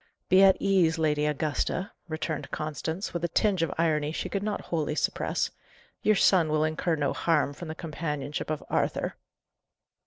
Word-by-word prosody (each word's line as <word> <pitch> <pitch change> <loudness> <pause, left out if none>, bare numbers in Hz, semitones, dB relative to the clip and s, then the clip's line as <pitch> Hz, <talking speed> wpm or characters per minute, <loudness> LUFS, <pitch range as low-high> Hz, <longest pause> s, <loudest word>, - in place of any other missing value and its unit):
"Be 185 +1 +6
at 195 -1 +7
ease, 180 -4 +3
Lady 150 -2 +1
Augusta," 155 +5 -1 0.2
returned 155 -1 -3
Constance, 160 +4 -4
with 170 -1 -3
a - - +2
tinge 195 0 +1
of 165 - 0
irony 155 -2 +1
she - - -3
could 200 - -2
not 210 0 -2
wholly 150 -2 0
suppress. - - 0 0.5
"Your 215 - +4
son 180 -4 +4
will 155 0 +2
incur 155 +2 0
no 145 -3 0
harm 150 -4 +1
from 170 +4 -8
the 155 - -5
companionship 150 -4 -4
of 155 -1 -2
Arthur." - - -1
160 Hz, 165 wpm, -28 LUFS, 150-175 Hz, 0.5 s, at